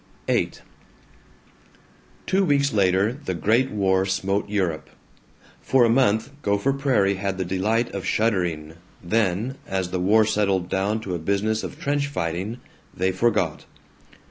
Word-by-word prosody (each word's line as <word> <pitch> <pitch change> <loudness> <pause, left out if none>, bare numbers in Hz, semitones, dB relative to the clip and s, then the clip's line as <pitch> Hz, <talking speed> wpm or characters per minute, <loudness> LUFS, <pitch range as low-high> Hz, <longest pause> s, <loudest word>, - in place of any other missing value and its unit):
VIII - - +1 1.7
Two 195 +1 +2
weeks 140 -4 +2
later 100 +2 +2
the 125 -10 -5
Great 115 +9 +2
War 95 -2 +1
smote 100 +1 -1
Europe. 90 -7 -1 0.7
For 130 -2 +3
a - - +2
month 115 0 +2
Gopher 100 +5 +1
Prairie 125 -9 +1
had 95 -1 -2
the 95 - -2
delight 105 +6 0
of 100 - -4
shuddering, 90 -8 0 0.3
then, 110 +6 0
as 95 -2 -2
the 90 - -1
war 105 +4 +4
settled 100 -4 0
down 100 +4 0
to 95 -4 -5
a 85 - -2
business 100 +5 0
of - - -7
trench 145 0 0
fighting, 95 - -3 0.3
they 95 +1 0
forgot. 95 -5 0
100 Hz, 140 wpm, -23 LUFS, 95-115 Hz, 1.7 s, war